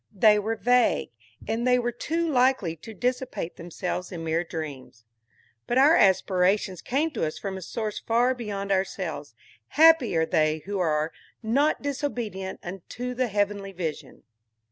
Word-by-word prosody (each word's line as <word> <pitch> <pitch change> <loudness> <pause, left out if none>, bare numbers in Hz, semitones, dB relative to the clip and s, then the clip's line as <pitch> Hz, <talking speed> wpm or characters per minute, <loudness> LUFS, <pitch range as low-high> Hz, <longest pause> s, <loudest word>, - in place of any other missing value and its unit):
They 210 +1 +5
were 220 +2 -2
vague, 245 - +2 0.4
and 225 +3 -1
they 250 0 +5
were 240 -1 -1
too 330 +8 -2
likely 255 - +2
to 165 +8 -11
dissipate 250 -5 -3
themselves 175 +1 -4
in 170 -3 -6
mere 165 +1 0
dreams. 145 -8 -7 0.6
But 240 - 0
our 290 +5 +6
aspirations 190 -1 +2
come 300 +6 0
to - - -3
us 155 -1 -2
from 195 -2 -5
a 190 - -6
source 215 +3 -4
far 240 +3 +2
beyond 205 -5 -4
ourselves. 185 - -2 0.4
Happy 315 - +6
are 160 - +3
they 155 -1 +1
who 200 0 -3
are 155 -2 +1 0.3
"not 280 +9 +1
disobedient 240 -9 -4
unto 195 +8 -6
the 255 0 0
heavenly 200 -1 -1
vision"! 160 -6 -6
205 Hz, 150 wpm, -26 LUFS, 175-245 Hz, 0.6 s, our